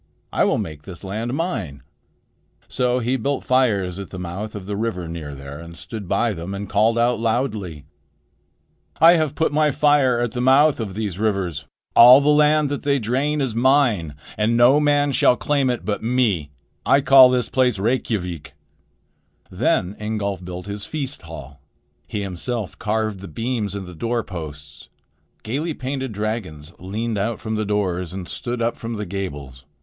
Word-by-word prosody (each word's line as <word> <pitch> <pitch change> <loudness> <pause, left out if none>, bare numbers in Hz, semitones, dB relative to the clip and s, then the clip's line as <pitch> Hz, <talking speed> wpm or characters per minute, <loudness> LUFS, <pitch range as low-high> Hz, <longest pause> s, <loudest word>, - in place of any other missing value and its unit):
"I - - +3
will - - +2
make 75 -2 -5
this 90 +3 -10
land 110 +6 -3
mine." 110 - -3 0.8
So 125 0 0
he 125 +2 0
built 140 +3 -2
fires 100 -8 +1
at 100 - -7
the 95 - -8
mouth 90 +5 -6
of 100 -3 -7
the 100 +1 -4
river 100 -5 -3
near 80 -4 -6
there, 70 +1 -9
and 85 0 -10
stood 110 -5 -6
by 105 +4 +1
them 90 +2 -6
and 100 +1 -5
called 110 +3 +2
out 120 -1 +2
loudly: 110 - -2 1.1
"I 165 +2 +8
have 155 -3 -1
put 160 - +1
my 150 0 +3
fire 145 -4 +3
at 120 -1 -1
the 125 - -3
mouth 135 +3 +4
of 100 -5 -4
these 100 -4 -3
rivers. 95 -9 -1 0.3
All 125 +3 +10
the 145 +1 +1
land 150 0 +4
that 145 - -3
they 140 -1 +1
drain 135 +6 0
is 130 -5 -1
mine, 115 - +2 0.2
and 115 +2 +2
no 125 +5 +6
man 145 -1 +2
shall 125 -2 +4
claim 140 -3 +1
it 125 -2 -2
but 105 -1 -2
me. 110 - +1 0.3
I - - +4
will 140 - -1
call 135 -2 +8
this 125 -1 0
place 125 -4 +2
Reykjavik." 90 - -2 1.0
Then 95 +3 0
Ingolf 105 -3 -3
built 90 0 -7
his 100 0 -6
feast 145 0 -5
hall. 70 -4 -11 0.5
He 105 - -3
himself 100 +3 -4
carved 110 -2 -1
the 100 - -9
beams 110 +2 -3
and 100 -1 -5
the 90 - -10
door 115 +6 -2
posts. 75 -6 -9 0.5
Gaily 145 +8 -3
painted 130 -1 -4
dragons 100 -8 -4
leaned 105 +4 -3
out 110 +3 -2
from 110 -1 -3
the 110 0 -1
doors 95 -4 -1
and 95 -2 -6
stood 120 -1 -4
up 115 - 0
from 115 0 -6
the 105 -1 -4
gables. 75 -9 -6
110 Hz, 175 wpm, -21 LUFS, 90-130 Hz, 1.1 s, All